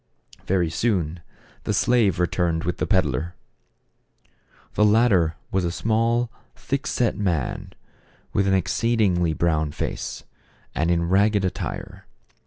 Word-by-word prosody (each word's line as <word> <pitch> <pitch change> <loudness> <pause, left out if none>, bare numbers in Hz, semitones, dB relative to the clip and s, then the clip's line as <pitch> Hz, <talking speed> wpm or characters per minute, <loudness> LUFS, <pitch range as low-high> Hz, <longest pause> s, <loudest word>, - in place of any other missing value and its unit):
Very 90 -3 +1
soon 85 -3 0 0.4
the - - -1
slave 115 -8 +2
returned 85 -2 0
with 90 - -2
the - - -1
peddler. 85 -3 0 1.4
The 105 - +2
latter 105 -7 +4 0.2
was 95 -1 +1
a 85 - 0
small, 115 +5 +1 0.2
thick 140 +1 -3
set 120 -3 +1
man, 90 -10 -2 0.6
with 100 0 +2
an 95 - +3
ex 95 - 0
ceedingly 95 -9 +1
brown 80 -3 +1
face, - - -4 0.5
and 80 +3 0
in 85 -1 +1
ragged 100 +2 +3
attire. 90 - -5
95 Hz, 125 wpm, -23 LUFS, 85-110 Hz, 1.4 s, latter